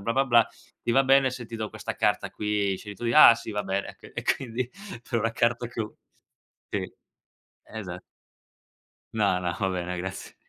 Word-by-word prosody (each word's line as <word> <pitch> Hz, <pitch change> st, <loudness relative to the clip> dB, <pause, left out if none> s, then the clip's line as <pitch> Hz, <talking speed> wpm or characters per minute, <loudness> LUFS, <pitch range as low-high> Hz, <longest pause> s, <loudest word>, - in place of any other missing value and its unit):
blah-blah-blah, 120 Hz, +2 st, +3 dB, 0.4 s
ti 120 Hz, -, +1 dB
va 135 Hz, -, +5 dB
bene 135 Hz, 0 st, +5 dB
se 125 Hz, -1 st, -7 dB
ti 115 Hz, 0 st, -7 dB
do 110 Hz, -1 st, -3 dB
questa -, -, -6 dB
carta -, -, +1 dB
qui? 105 Hz, -2 st, 0 dB
Scegli 105 Hz, -1 st, -8 dB
tu." 120 Hz, -, -8 dB
"Ah, 125 Hz, -5 st, +10 dB
sì 115 Hz, -1 st, -7 dB
va 105 Hz, -2 st, -2 dB
bene." 95 Hz, +1 st, -3 dB, 0.2 s
E -, -, -3 dB
quindi 125 Hz, -1 st, -1 dB, 0.4 s
per 120 Hz, -, +1 dB
una 115 Hz, 0 st, 0 dB
carta 120 Hz, +1 st, +1 dB
che 120 Hz, -, -6 dB
ho 110 Hz, -1 st, -5 dB, 0.7 s
sì, -, -, -2 dB, 0.7 s
esa -, -, -7 dB, 1.1 s
No, 100 Hz, -4 st, +2 dB
no, 90 Hz, -1 st, -1 dB
ho 95 Hz, -2 st, +1 dB
bene, 90 Hz, 0 st, -3 dB
grazie. 95 Hz, +1 st, -6 dB
115 Hz, 170 wpm, -27 LUFS, 100-120 Hz, 1.1 s, Ah